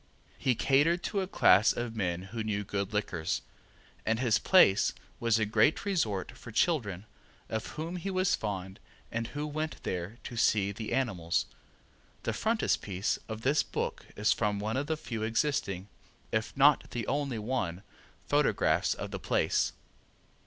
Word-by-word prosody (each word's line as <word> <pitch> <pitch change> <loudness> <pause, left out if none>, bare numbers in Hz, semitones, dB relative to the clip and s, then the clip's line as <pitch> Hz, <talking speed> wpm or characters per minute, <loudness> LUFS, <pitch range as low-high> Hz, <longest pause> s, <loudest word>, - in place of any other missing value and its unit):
He 130 -2 +2
catered 150 +9 +3
to 200 - -1
a 190 - -2
class 100 - +5
of 120 -1 -4
men 90 -4 -1
who 115 -2 -2
knew 105 -1 -1
good 100 0 -3
liquors, 95 -4 -1 0.6
and 110 0 +1
his 120 -4 +3
place 180 - +5 0.3
was 115 -1 +3
a 110 - +2
great 110 - +3
resort 115 - 0
for 115 - -11
children, 110 - +1 0.4
of 110 0 -3
whom 165 +4 -3
he 190 +3 -4
was 185 -1 +2
fond 95 -3 -3 0.3
and 115 0 -2
who 145 +4 -4
went 155 +1 -4
there 90 +5 -3
to 120 - -7
see 105 -3 +3
the 110 +2 -6
animals. 95 -11 0 0.8
The - - -1
frontispiece 105 - 0
of 110 0 -5
this 140 +5 +3
book - - -4
is 105 +1 +3
from 105 -2 0
one 105 +3 -2
of 140 +2 -1
the 160 - -1
few 115 -7 -5
existing 110 -5 0 0.4
(if 110 +4 -2
not 145 +1 +5
the 120 -3 -3
only 140 -4 -1
one) 105 -6 -2 0.4
photographs - - +2
of - - -6
the - - -4
place. - - +1
110 Hz, 160 wpm, -30 LUFS, 100-145 Hz, 0.8 s, class